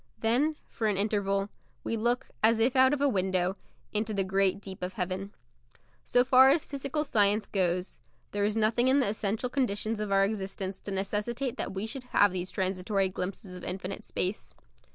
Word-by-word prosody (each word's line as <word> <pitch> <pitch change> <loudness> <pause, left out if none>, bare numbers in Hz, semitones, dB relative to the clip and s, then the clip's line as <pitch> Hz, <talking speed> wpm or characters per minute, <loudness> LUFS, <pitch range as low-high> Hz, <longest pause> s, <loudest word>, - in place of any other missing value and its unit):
Then, 260 +8 +2
for 220 - -2
an 205 -2 +1
interval, 200 -1 0 0.3
we - - -2
look, 240 +3 -1
as 225 +1 +4
if 245 +4 +2
out 260 0 +6
of 290 -1 0
a 285 - +4
window, 185 -4 +1 0.4
into 215 0 -1
the 195 - +1
great 195 0 +1
deep 190 -2 -9
of 180 +1 -3
heaven. 185 +1 -3 0.7
So 245 - +3
far 260 +1 +7
as 300 +3 +3
physical 280 +1 -2
science 210 -6 +2
goes, 180 -1 -1 0.3
there 205 0 -1
is 210 +2 0
nothing 225 +3 +2
in 265 +2 +4
the 255 - +2
essential 215 +3 -1
conditions 225 -4 -1
of 210 -1 -3
our 195 0 +4
existence 195 -2 -4
to 205 - -6
necessitate 210 +6 -2
that - - -4
we 195 +3 -2
should 255 +3 -7
have 205 -5 +4
these 180 0 -4
transitory 190 +1 0
glimpses 185 0 -5
of 180 - -9
infinite 190 +1 -5
space. 185 +3 -3
205 Hz, 185 wpm, -29 LUFS, 190-240 Hz, 0.7 s, far